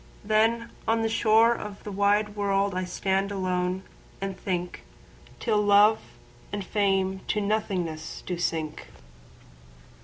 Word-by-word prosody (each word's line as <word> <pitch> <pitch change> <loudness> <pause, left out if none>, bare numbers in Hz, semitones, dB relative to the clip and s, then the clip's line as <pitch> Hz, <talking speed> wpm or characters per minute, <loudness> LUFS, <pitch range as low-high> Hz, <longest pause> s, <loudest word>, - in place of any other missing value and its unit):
—then 225 +2 +2 0.2
on 225 0 +2
the - - +2
shoreOf 225 -1 +2
the 210 - -6
wide 205 +1 +2
world 200 -1 +1
I 185 0 -2
stand 195 +2 -1
alone, 185 -1 -1 0.4
and 195 -1 -3
thinkTill 190 +4 -4
Love 205 +2 +6 0.5
and 205 -2 -4
Fame 195 -2 +1
to 210 - 0
nothingness 185 -7 -2
do 180 -2 -3
sink. 160 -3 -2
200 Hz, 115 wpm, -26 LUFS, 185-215 Hz, 0.5 s, Love